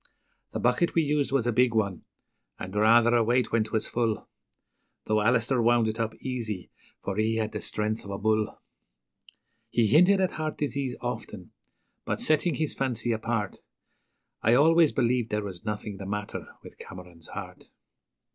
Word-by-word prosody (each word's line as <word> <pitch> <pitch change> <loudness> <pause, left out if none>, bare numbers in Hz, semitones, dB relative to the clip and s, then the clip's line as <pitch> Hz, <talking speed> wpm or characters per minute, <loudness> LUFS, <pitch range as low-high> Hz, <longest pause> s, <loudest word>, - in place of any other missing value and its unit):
The - - -2
bucket 125 +8 +1
we 165 - +4
used 145 -2 0
was 135 -4 +1
a 120 - +2
big 125 0 +3
one, 100 -4 -1 0.5
and 95 - -7
rather 115 +3 +5
a 115 - +4
weight 120 +1 +1
when 115 -1 +3
'twas 110 0 -1
full, 115 -3 -1 0.8
Though 110 0 +2
Alister 120 +3 +2
wound 120 -1 +3
it 110 +1 -3
up 110 -1 -2
easy, 110 -7 -5 0.3
for 100 0 -3
he 110 +1 +1
had 110 -1 -1
the - - -5
strength 110 +1 -2
of 100 - -10
a 100 - -3
bull. 110 +1 0 1.1
He 115 - +2
hinted 180 - +5
at 185 -1 +1
heart 155 0 -4
disease 140 -2 -2
often, - - -6 0.5
but, - - -2
setting 155 +1 +2
his 155 +2 -1
fancy 125 -3 -1
apart, 110 -2 -2 0.8
I 115 +2 +4
always 160 +3 +5
believed 120 -2 +1
there 105 0 -1
was 95 0 -8
nothing 105 -1 -4
the 95 0 -7
matter 105 +1 -4 0.2
with - - -13
Cameron's 90 -3 -11
heart. - - -8
115 Hz, 165 wpm, -27 LUFS, 105-130 Hz, 1.1 s, rather